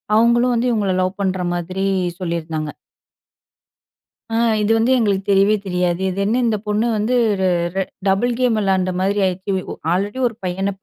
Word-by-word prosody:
அவங்களும் 240 +2 +4
வந்து 245 +2 +1
இவங்கள 205 -4 0
லவ் 185 +2 -2
பண்ற 190 -1 -1
மாதிரி 185 +3 -3 0.3
சொல்லியிருந்தாங்க. 165 -3 -3 1.6
ஆ 225 - -2 0.3
இது 210 +2 +1
வந்து 230 +3 +2
எங்களுக்கு 200 -4 +1
தெரியவே 200 +2 +4
தெரியாது. 180 0 0
இது 190 +2 -4
என்ன 220 +4 +1
இந்தப் 215 -2 -1
பொண்ணு 210 +2 +1
வந்து, 225 +4 0 0.3
ர - - +2 0.3
ர - - 0 0.3
டபுள் 235 +6 +2
கேம் 245 -3 +2
விளையாண்ட 190 -2 +1
மாரி 200 +2 +1
ஆயிருச்சு. 185 +2 -2 0.2
ஒ - - -4 0.2
ஆல்ரெடி 205 +7 -2
ஒரு 230 - -7
பையன 190 +2 -1
195 Hz, 160 wpm, -19 LUFS, 185-225 Hz, 1.6 s, அவங்களும்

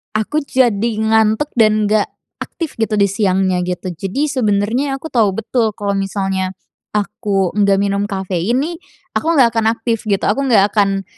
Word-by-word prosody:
aku 220 +8 0
jadi 235 -3 +2
ngantuk 220 +5 +2
dan 215 -1 +3
nggak 215 -1 +2 0.4
aktif 330 -4 -6
gitu 220 -1 0
di 200 - +5
siangnya, 190 -3 +1
gitu. 180 +1 -4
Jadi 195 - -2
sebenernya 235 +3 0
aku 295 - -7
tahu 225 -5 +4
betul 225 +1 0
kalau 200 -1 -1
misalnya 195 -1 -1 0.5
aku 205 -2 -1
nggak 200 -1 +3
minum 200 0 0
kafein 190 +3 -1
nih, 335 +3 -3 0.4
aku - - -1
nggak 240 -3 +5
akan 225 -1 0
aktif, 230 -1 -2
gitu. 195 -1 +1
Aku 275 +7 +1
nggak 205 -3 +4
akan 195 -2 +2
210 Hz, 160 wpm, -17 LUFS, 195-230 Hz, 0.5 s, di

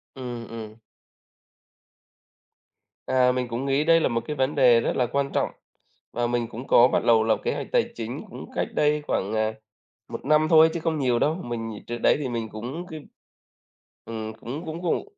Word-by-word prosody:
Ừm, 120 -3 -6
ừm. 110 -2 -8 2.3
À, 125 -1 +3
mình 125 -1 -2
cũng 120 +3 -4
nghĩ 140 +2 +2
đây 165 +1 +5
là - - +2
một 115 0 -1
cái 150 - -3
vấn 135 +2 0
đề 125 -4 +6
rất - - -1
là 125 - +2
quan 140 +2 -1
trọng, - - +1 0.6
và 120 0 0
mình 120 -1 -1
cũng 120 +4 -9
có 120 +1 +7
bắt - - 0
đầu 115 -2 +5
lập 110 0 +2
kế - - 0
hoạch - - -5
tài - - +2
chính 115 +1 -5
cũng - - -9
cách - - 0
đây 150 0 +2
khoảng, 100 +3 -1
à, 110 0 0 0.6
1 - - -7
năm 155 +2 +4
thôi 160 -1 +7
chứ 170 - -2
không 160 -1 -1
nhiều 125 -3 +2
đâu, 155 +5 +2
mình 115 - -5
trước 120 - -3
đấy 120 - +3
thì 140 -4 -3
mình 115 -2 -3
cũng 125 +12 -6
c - - -14 1.1
ừm, 110 -1 -5
cũng 125 +9 -7
cũng 160 +2 -6
vội, 175 - 0
125 Hz, 200 wpm, -25 LUFS, 115-150 Hz, 2.3 s, có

